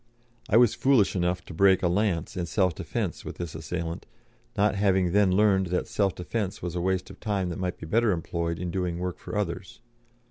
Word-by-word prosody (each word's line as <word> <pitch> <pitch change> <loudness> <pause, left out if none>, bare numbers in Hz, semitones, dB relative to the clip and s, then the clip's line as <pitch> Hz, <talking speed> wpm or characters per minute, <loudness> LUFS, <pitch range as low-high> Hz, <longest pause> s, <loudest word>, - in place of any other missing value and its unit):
I 105 - +5
was 120 -2 +6
foolish 130 -9 +3
enough 90 0 0
to - - -9
break 95 +2 +4
a - - +4
lance 90 -1 0
in 90 -2 -2
self 95 -1 +1
defence - - -4
with - - -7
this 85 -3 -5
assailant, 80 +1 -5 0.5
not 105 +2 +3
having 95 -3 +2
then 100 0 +4
learned 95 -1 +3
that 90 +1 -1
self 100 -3 0
defence 95 +2 -3
was 90 -1 -4
a 90 - -2
waste 95 0 -1
of - - -14
time 100 -4 -1
that 85 - -5
might 90 -1 -2
be - - -8
better 110 +6 +2
employed 85 -1 -2
in 90 0 -4
doing 90 -2 -2
work 90 0 -4
for - - -5
others. 95 -2 -4
90 Hz, 210 wpm, -27 LUFS, 85-100 Hz, 0.5 s, was